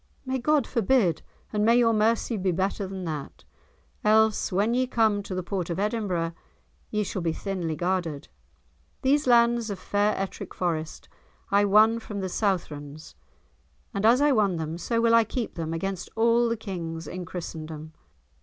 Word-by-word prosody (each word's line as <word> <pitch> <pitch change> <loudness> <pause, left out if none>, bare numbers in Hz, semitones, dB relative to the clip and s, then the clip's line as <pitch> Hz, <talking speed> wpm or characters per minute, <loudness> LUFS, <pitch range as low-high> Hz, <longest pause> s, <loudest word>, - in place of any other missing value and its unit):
"May 260 0 -1
God 290 +1 +2
forbid, 225 - +2 0.3
and 210 0 +1
may 230 +2 +5
your 230 -2 +4
mercy 225 +2 +1
be 190 -2 0
better 190 +3 -1
than 190 -1 -6
that, 155 -4 -6 0.6
else, 215 0 +3
when 205 +5 +1
ye 255 +1 +1
come 220 -4 +2
to 195 -2 -6
the 185 - -2
port 180 -1 -3
of 170 - -2
Edinburgh, 195 -5 -1 0.6
ye 210 0 0
shall 190 -1 -4
be 165 -1 0
thinly 175 -4 -3
guarded. 175 -4 -2 0.8
These 280 +1 +2
lands 235 -1 +4
of 200 - -3
fair 205 +3 0
Ettrick 195 0 -5
Forest 160 -3 -3 0.4
I 200 +1 +4
won 215 +3 +5
from 210 -2 -6
the 190 -1 -3
Southrons, 155 -7 -3 0.8
and 200 - -2
as 235 +5 +5
I 295 0 +4
won 205 -7 +2
them 160 +1 -4
so 230 +5 -1
will 230 0 +3
I 230 0 +6
keep 230 +2 -4
them, 165 -1 -4
against 185 +2 -3
all 235 +1 +3
the 230 - -1
Kings 165 -6 -6
in 180 +3 -5
Christendom." 160 -3 -7
200 Hz, 170 wpm, -26 LUFS, 175-230 Hz, 0.8 s, I